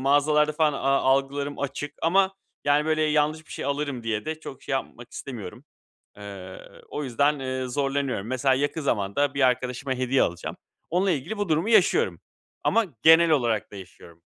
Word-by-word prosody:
mağazalarda 150 +2 +3
falan 155 -1 +2
a 140 - -4
algılarım 135 +1 +1
açık 145 +1 -4
ama, 190 +3 +3 0.3
yani, 145 +1 +3
böyle 155 0 +1
yanlış 155 +1 +1
bir - - -11
şey - - -5
alırım 140 -3 -2
diye 110 -2 -2
de 155 0 -4
çok 135 - -9
şey - - -6
yapmak 120 -2 -4
istemiyorum. 120 -2 -8 0.5
Eee, 100 -2 -9 0.3
o 150 - -4
yüzden, 140 +3 +1
eee, 130 -1 -3
zorlanıyorum. 135 -4 -1
Mesela 130 +1 +2
yakın 145 +3 -1
zamanda 130 +3 0
bir 140 - -2
arkadaşıma 125 +1 -1
hediye 130 +1 +1
alacağım. 85 0 -2 0.3
Onunla 185 +3 +2
ilgili 165 +8 -3
bu 205 -4 -2
durumu 160 +7 +1
yaşıyorum 230 - +3 0.4
ama 230 -1 +3 0.2
genel 165 +1 +7
olarak 120 -9 +1
da - - -10
yaşıyorum. 85 -3 -13
140 Hz, 165 wpm, -25 LUFS, 125-155 Hz, 0.5 s, genel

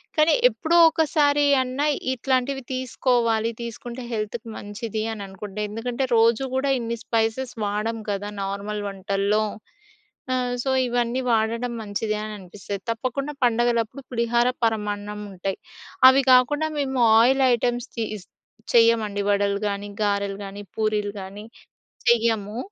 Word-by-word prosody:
కానీ 310 +1 +4 0.2
ఎప్పుడో 315 +10 0
ఒకసారి 295 -2 +2 0.2
అన్నా 260 +3 -1 0.3
ఇట్లాంటివి 260 +1 -1
తీసుకోవాలి. 240 -3 +1
తీసుకుంటే 235 +2 -7
హెల్త్‌కి 225 +1 -4
మంచిది 215 +1 -5
అని 215 - -7
అనుకుంటే, 195 +1 -8
ఎందుకంటే 240 +4 -2
రోజు 230 +3 +4
కూడా 275 +1 +1
ఇన్ని 235 0 -3
స్పైసెస్ 230 +3 -1
వాడం 210 +3 -2
కదా! 205 0 -2
నార్మల్ 200 +2 -4
వంటల్లో. 200 +2 0 0.9
ఆ - - +2 0.3
సో, 270 - -1 0.2
ఇవన్నీ 240 +1 0
వాడడం 230 +2 0
మంచిది 215 +1 -2
అని 215 0 -5
అనిపిస్తది. 195 +2 -7
తప్పకుండా 255 +5 -3
పండగలప్పుడు 240 +2 +1
పులిహార, 235 0 +2 0.2
పరమాన్నం 210 -1 -2
ఉంటాయి. 190 +1 -4 0.5
అవి 270 +1 +4
కాకుండా 295 +5 +4
మేము 265 -2 -1 0.2
ఆయిల్ 265 +3 +4
ఐటెమ్‌స్ 240 0 -1
తిస్ 215 -4 -4 0.5
చెయ్యమండి 225 -3 +4
వడలు 200 0 +1
గానీ, 200 0 -4
గారెలు 200 -1 -1
గానీ, 200 +1 -8
పూరీలు 210 -2 0
గానీ 200 +3 -9 0.6
చెయ్యము. 225 -2 +2
225 Hz, 120 wpm, -24 LUFS, 205-250 Hz, 0.9 s, కానీ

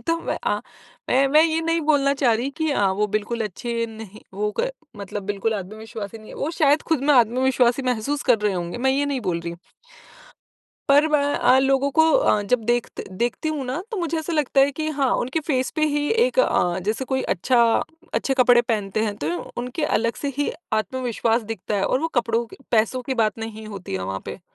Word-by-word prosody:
तो 330 - +2
मैं - - -3
अ, - - +2 0.5
मैं 270 +2 +4
मैं 305 +3 +6
ये 325 0 +1
नहीं 330 0 0
बोलना 280 -2 +3
चाह 265 -4 +2
रही 245 +5 -2
कि 315 -2 0
अ, 205 -8 +2
वो 210 +2 0
बिल्कुल 220 +2 -1
अच्छे 230 +3 -3
नहीं 220 -2 -11
वो 210 +1 -1
क - - 0 0.3
मतलब 200 0 -6
बिल्कुल 205 +2 -1
आत्मविश्वासी 215 +2 -7
नहीं 215 - -14
है, - - -10
वो 295 - -2
शायद 295 -1 +4
खुद 285 - +1
में 295 - +4
आत्मविश्वासी 250 +1 +3
महसूस 255 +3 -1
कर 235 - +5
रहे 210 -1 +1
होंगे, 175 +4 -4
मैं 265 +1 +2
ये 285 +2 +1
नहीं 275 -3 -2
बोल 175 -5 -2
रही 170 - -5
हूँ। 170 - -11 1.3
पर 290 +2 +6
मैं 300 -2 +2
अ, 255 - +4
लोगों 270 +1 +2
को 320 - +8
अ, - - +3
जब 225 +3 0
देखत 240 0 -1
देखती 240 +10 -2
हूँ 295 -4 -3
ना 265 +7 -3
तो 440 - -3
मुझे 335 -2 -1
ऐसा 325 +2 -4
लगता 290 -3 +2
है 275 +1 +3
कि 310 +3 -4
हाँ, 275 -4 0
उनके 260 +6 -1
फेस 255 -3 +1
पे 310 - +2
ही 295 0 0 0.2
एक - - 0
अ, 175 - +2
जैसे 215 +7 -2
कोई 265 +1 -1
अच्छा 240 +7 +2 0.5
अच्छे 270 - 0
कपड़े 245 -1 +6
पहनते 215 -3 -1
हैं 205 -2 -3
तो 150 - -3 0.3
उनके 250 +6 -3 0.2
अलग 230 0 -1
से 285 - -1
ही 290 - +1 0.2
आत्मविश्वास 235 0 0
दिखता 205 0 -4
है 195 - 0
और 255 - +1
वो 325 - -1
कपड़ों 235 0 +1
के - - -14 0.2
पैसों 230 +3 +2
की 265 - -2
बात 215 +1 -1
नहीं 220 -1 -7
होती 195 - -7
है 95 - -2
वहाँ 95 +1 -3
पे। - - -7
245 Hz, 220 wpm, -23 LUFS, 215-280 Hz, 1.3 s, को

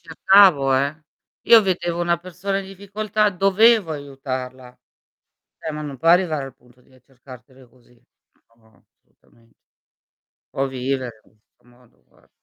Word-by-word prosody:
cercavo 165 -4 +4
eh. 140 +4 -2 0.4
Io 230 -2 +7
vedevo 175 -3 -2
una 170 0 0
persona 185 +3 -5
in 195 - -7
difficoltà, 205 +2 -2
dovevo 195 0 +3
aiutarla. 130 -3 -8 0.8
Eh, 160 - -6
ma 150 0 -6
non 145 -2 -7
può 165 +5 -2
arrivare 165 -5 +2
al 135 -2 -11
punto 125 -1 -26
di, 130 - -28
eh, 130 - -23
cercartele 130 0 -17
così. 120 0 -27 0.6
No, 110 -1 -29 0.2
assolutamen 115 0 -31 1.0
O 135 - -1
vivere 130 0 -3 0.2
in - - -30
questo 105 - -43
modo, 120 0 -26
guar - - -29
145 Hz, 140 wpm, -21 LUFS, 130-185 Hz, 1.0 s, Io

